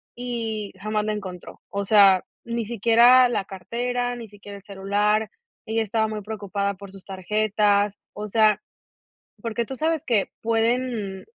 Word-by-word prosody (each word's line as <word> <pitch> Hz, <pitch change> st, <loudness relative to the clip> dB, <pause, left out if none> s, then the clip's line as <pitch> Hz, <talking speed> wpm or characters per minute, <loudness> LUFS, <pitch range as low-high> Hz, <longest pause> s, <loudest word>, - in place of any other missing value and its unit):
y 225 Hz, -4 st, -4 dB
jamás 215 Hz, +1 st, -1 dB
la 215 Hz, -, 0 dB
encontró. 185 Hz, -4 st, -8 dB
O 200 Hz, 0 st, -2 dB
sea, 195 Hz, -3 st, +6 dB, 0.2 s
ni 235 Hz, -1 st, -2 dB
siquiera 235 Hz, +3 st, +6 dB
la 205 Hz, -, -1 dB
cartera, 245 Hz, +6 st, -3 dB
ni 230 Hz, -3 st, -9 dB
siquiera 205 Hz, 0 st, -11 dB
el 200 Hz, -, -15 dB
celular, 205 Hz, +2 st, 0 dB, 0.4 s
ella 225 Hz, 0 st, 0 dB
estaba 220 Hz, +1 st, 0 dB
muy 215 Hz, -1 st, -5 dB
preocupada 200 Hz, -2 st, -3 dB
por 200 Hz, 0 st, -11 dB
sus 195 Hz, -, -12 dB
tarjetas. 205 Hz, +1 st, +1 dB, 0.2 s
O 210 Hz, +1 st, -6 dB
sea, 215 Hz, -1 st, +3 dB, 0.8 s
porque 230 Hz, 0 st, -2 dB
tú 265 Hz, -, -6 dB
sabes 320 Hz, -1 st, 0 dB
que 225 Hz, -5 st, +1 dB
pueden, 225 Hz, -3 st, -1 dB
215 Hz, 150 wpm, -24 LUFS, 200-230 Hz, 0.8 s, sea